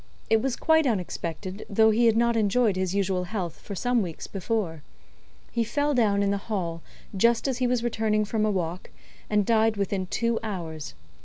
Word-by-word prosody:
It 225 -1 +5
was 265 -1 -1
quite 320 -2 +3
unexpected, 185 -2 -3
though 220 +2 +5
he 230 +2 +3
had 225 -1 +3
not 235 0 +3
enjoyed 220 0 +2
his 185 0 -1
usual 190 -2 0
health 175 -4 -4
for 200 - -7
some 245 +4 +1
weeks 170 -5 -5
before. 190 -5 -2 0.7
He 235 - +1
fell 290 +6 0
down 205 -5 +2
in 200 - +1
the 200 - +1
hall, 180 -6 -3 0.3
just 235 +6 +3
as 260 -2 -1
he 250 - +2
was 245 -1 0
returning 220 -2 +1
from 215 0 -1
a 215 - +2
walk, 180 -3 -3 0.4
and 210 -1 +2
died 220 -1 +3
within 195 -2 -1
two 230 +3 0
hours. 165 - -5
215 Hz, 185 wpm, -26 LUFS, 185-230 Hz, 0.7 s, It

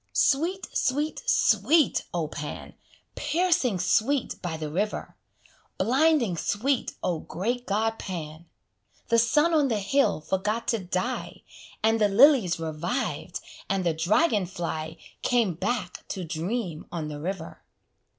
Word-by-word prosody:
Sweet, 335 +7 +2
sweet, 295 +4 0
sweet, 315 -4 +3
O 170 -3 -1
Pan! 150 -1 -7 0.4
Piercing 310 - +1
sweet 230 +9 +1
by 170 -3 -3
the 155 -1 -5
river! 205 +6 -2 0.6
Blinding 265 - +3
sweet, 235 - 0
O 170 -3 0
great 240 +11 -3
god 225 +2 0
Pan! 165 -2 -6 0.6
The 230 -1 +5
sun 295 +9 +3
on 300 -3 +4
the 225 -4 0
hill 270 - +2
forgot 205 +7 -2
to 230 - +1
die, 185 +7 -3 0.4
And 225 0 +3
the 205 - +4
lilies 230 - +5
reviv'd, 165 - -3 0.3
and 195 -1 0
the 170 - +2
dragon 205 - +2
fly 165 -3 -4 0.2
Came 235 -7 +2
back 195 +1 -3
to 185 - -4
dream 170 +1 -3
on 165 -3 -3
the 150 -1 -6
river. 170 +1 -5
205 Hz, 130 wpm, -26 LUFS, 170-255 Hz, 0.6 s, The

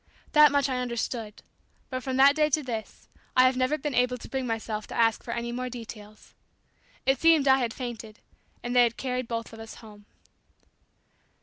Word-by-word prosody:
That 300 -1 +7
much 285 0 +2
I 255 -2 -2
understood; 235 -3 -4 0.5
but 255 0 -3
from 260 0 -3
that 280 +1 +6
day 305 -1 +2
to 300 +1 +1
this, 225 -4 -6 0.3
I 255 - +8
have 255 0 +4
never 255 +4 +1
been 295 -1 -4
able 250 0 +1
to - - -11
bring 265 -2 -3
myself 220 -2 -4
to - - -8
ask 225 -2 +2
for - - -12
any 235 0 -3
more 250 +1 -4
details. 215 -3 -11 0.7
It 270 0 +2
seems 325 -3 +5
I 265 0 +6
had 240 -3 -1
fainted, 225 -3 -7 0.5
and 245 +1 -3
they 245 -1 +6
carried 250 +1 -4
us 230 0 -1
both 225 0 -10
home. 210 -2 -15
250 Hz, 185 wpm, -27 LUFS, 225-265 Hz, 0.7 s, I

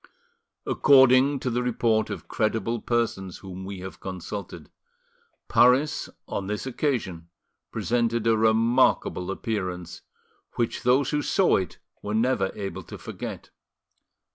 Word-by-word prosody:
According 135 0 +5
to 125 - -1
the 120 +1 0
report 115 -2 +1
of - - -6
credible 110 +1 -1
persons 110 -6 -1
whom 95 -1 -9
we 95 -1 -7
have 95 +1 -8
consulted, 95 +2 -7 0.8
Paris 130 +5 +3 0.2
on 95 - -4
this 105 +4 -3
occasion 115 - -2 0.4
presented 115 -1 0
a 115 -1 +4
remarkable 110 -4 +2
appearance, 95 -4 -4 0.5
which 120 -1 -1
those 125 +2 +3
who 150 - +1
saw 190 +5 +3
it 95 - -4 0.2
were 105 +1 -3
never 110 -4 +1
able 100 -1 -5
to - - -10
forget. - - -7
115 Hz, 120 wpm, -25 LUFS, 95-125 Hz, 0.8 s, According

